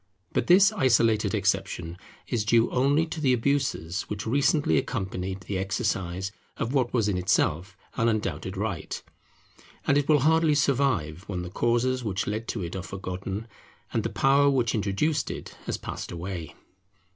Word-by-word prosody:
But - - 0
this 190 +2 +7
isolated 115 -5 +3
exception 95 -4 -1 0.3
is 115 -4 -1
due 115 +1 +3
only 140 +5 +3
to 160 -1 -6
the 130 -4 +3
abuses 120 - 0
which 105 0 -4
recently 140 - +3
accompanied 95 0 -4
the 95 +1 -3
exercise 95 -1 -2 0.3
of 115 +4 -2
what 130 -4 +1
was 115 -4 +1
in 95 -3 0
itself 95 0 0 0.2
an 115 +1 +3
undoubted 110 -2 -2
right; - - -3 0.9
and 140 +1 +4
it 145 - -3
will 150 -3 +5
hardly 160 +1 +4
survive 125 - +1
when 90 -3 -3
the 90 - -7
causes 120 +4 +1
which 100 -3 -1
led 110 +3 -3
to 100 - -3
it 85 - -5
are 95 - -3
forgotten, 95 +3 -5 0.5
and - - +1
the - - -2
power 140 +1 +4
which 125 -5 +1
introduced 105 +9 0
it - - -7
has - - -1
passed - - -6
away. 85 -2 -6
110 Hz, 160 wpm, -27 LUFS, 95-135 Hz, 0.9 s, this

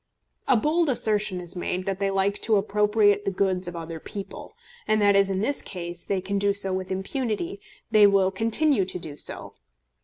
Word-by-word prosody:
A 260 - +4
bold 310 +6 +1
assertion 210 -6 +1
is 175 +1 -5
made 180 +1 -3
that 195 -1 -2
they 200 -1 0
like 195 +1 0
to 220 - +2
appropriate 205 0 +2
the 200 - 0
goods 190 -1 -1
of 175 - -6
other 165 -1 -6
people; 200 +4 -8 0.4
and 215 0 +2
that, 205 -1 +4
as 195 0 +4
in 190 0 -1
this 280 +6 0
case, 175 -2 -6
they 195 -2 -1
can 200 +2 -2
do 200 0 +2
so 195 -1 0
with 185 0 -4
impunity, 255 - -3 0.3
they 210 -2 +7
will 195 -1 +3
continue 230 +4 +1
to 185 0 -4
do 160 -4 -8
so. - - -7
200 Hz, 195 wpm, -25 LUFS, 185-215 Hz, 0.4 s, they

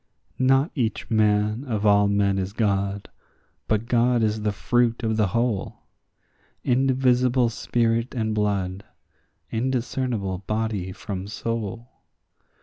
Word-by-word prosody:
Not 135 +4 +3
each 115 -5 -2
man 105 +2 +2
of 110 -5 -2
all 100 0 +5
men 100 -1 +2
is 95 +1 -3
God, 100 -2 -1 0.6
but 110 +1 0
God 120 0 +2
is 110 0 0
the 105 0 0
fruit 120 +2 +1
of 110 -1 0
the 105 -2 +2
whole; 115 0 -2 0.8
Indivisible 125 -1 +2
spirit 115 +1 0
and 110 -2 -1
blood, 100 -2 -1 0.7
indiscernible 120 -5 -1
body 105 -4 -2
from 95 0 -6
soul. 115 +1 -4
110 Hz, 115 wpm, -24 LUFS, 100-120 Hz, 0.8 s, all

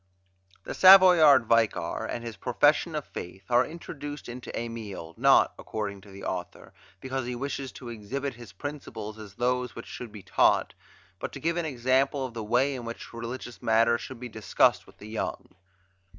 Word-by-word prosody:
The - - -5
Savoyard 180 -9 +8
Vicar 115 -1 +1
and 120 - -4
his 115 -2 -6
"Profession - - +2
of - - -3
Faith" 95 +2 -8
are 120 +1 +5
introduced 145 -2 -8
into 120 +1 -7
"Emile" 110 -8 -6
not, - - +5
according 100 -2 -5
to 100 - -16
the 100 0 -11
author, 90 -1 -6 0.3
because 130 +2 -4
he 125 - -3
wishes 135 +1 -4
to 125 - -9
exhibit 125 +5 -4
his 120 -4 -12
principles 110 -2 -7
as 105 -2 -11
those 125 +1 -1
which 115 - -8
should 120 -3 -8
be 105 -2 -11
taught, - - +2 0.5
but - - -4
to - - -7
give 165 +1 0
an 170 - -1
example 135 0 +1
of 125 - -7
the 115 -2 -5
way 125 +6 +2
in 125 -2 -6
which 115 0 -8
religious 120 +1 -7
matters 115 +1 +3
should 130 -3 -8
be 125 - -6
discussed 110 -2 +2
with - - -18
the 105 - -11
young. 110 0 -4
120 Hz, 180 wpm, -27 LUFS, 110-135 Hz, 0.5 s, Savoyard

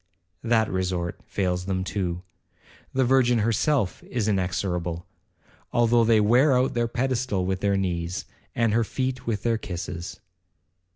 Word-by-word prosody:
That 115 -2 +3
resort 90 -2 -2
fails 90 -2 -1
them 95 -1 -1
too,—the 90 +7 -5
Virgin 125 -1 +4
herself 115 +1 +1
is 115 -4 -2
inexorable, 90 -3 -1 0.7
though 120 0 +4
they 115 -1 +4
wear 125 +6 +4
out 130 0 +1
her 120 0 +1
pedestal 125 -5 -1
with 95 0 -1
their 100 0 +1
knees, 90 -2 -2 0.3
and 115 -2 +2
her 115 +1 +3
feet 130 +2 -3
with 110 -3 -1
their 115 -2 +1
kisses. 90 -2 -6
105 Hz, 130 wpm, -25 LUFS, 90-120 Hz, 0.7 s, Virgin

